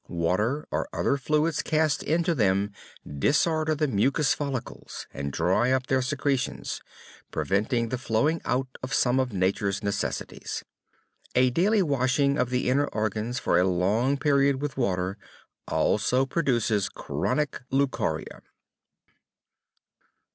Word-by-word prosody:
Water 100 - 0
or - - -2
other 140 - +1
fluids 150 +3 +1
cast 155 -2 +1
into 170 +3 +1
them 100 -5 +1 0.3
disorder 155 - +1
the 150 0 +1
mucous 135 +5 +2
follicles, 140 -4 -5
and 70 +1 -4
dry 105 - +2
up 130 -1 +1
their 130 0 +1
secretions, 135 0 -2 0.5
preventing 110 +4 0
the 125 - -2
flowing 130 +7 +1
out 130 +2 0
of 130 +1 -2
some 125 +1 +3
of 130 -2 0
Nature's 100 +1 0
necessities. 100 -1 -3 0.7
A 125 0 +4
daily 195 - +3
washing 140 -1 +1
of 125 - +1
the 125 0 0
inner 140 +3 +2
organs 110 +2 -2
for - - +2
a - - +4
long 105 +10 +1
period 140 -1 +2
with 145 -1 -3
water 95 -5 -1 0.5
also 130 +2 +2
produces 120 - +1
chronic 150 -1 -2
leucorrhea. 135 0 -1
130 Hz, 125 wpm, -26 LUFS, 105-145 Hz, 0.7 s, A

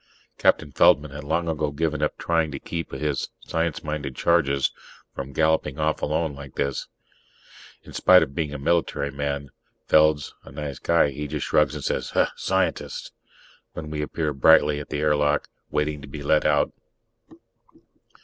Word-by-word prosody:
Captain 75 -2 +2
Feldman 70 +2 +4
had 75 +1 -7
long 85 +3 -1
ago 75 -2 -1
given 75 +1 -2
up 75 - 0
trying 80 -2 +1
to 70 - -5
keep 85 -1 -5
his 75 -3 -2
science 80 -1 -2
minded 75 -3 -4
charges 70 -5 +2 0.4
from 70 0 -6
galloping 80 -1 +1
off 75 0 0
alone 80 0 0
like 70 -1 -11
this. 70 -1 -2 1.0
In - - -13
spite 90 -2 +6
of 70 -3 -6
being 75 0 -2
a 75 - -5
military 70 -1 0
man, 70 0 -3 0.3
Feld's 75 -2 +3
a - - -13
nice 70 -1 -6
guy; 85 -4 +3
he 75 +2 -5
just - - -3
shrugs - - +2
and - - -6
says, - - -2 0.2
"Scientists!" - - -1 0.6
when 75 -1 -7
we 75 -1 -2
appear 75 0 -2
brightly 75 +1 +5
at 75 - -8
the 75 - -2
airlock, 75 -1 +2 0.2
waiting 75 -1 -1
to 70 - -10
be 70 +2 -8
let 75 +2 +2
out. 75 -1 +2
75 Hz, 160 wpm, -24 LUFS, 70-80 Hz, 1.0 s, spite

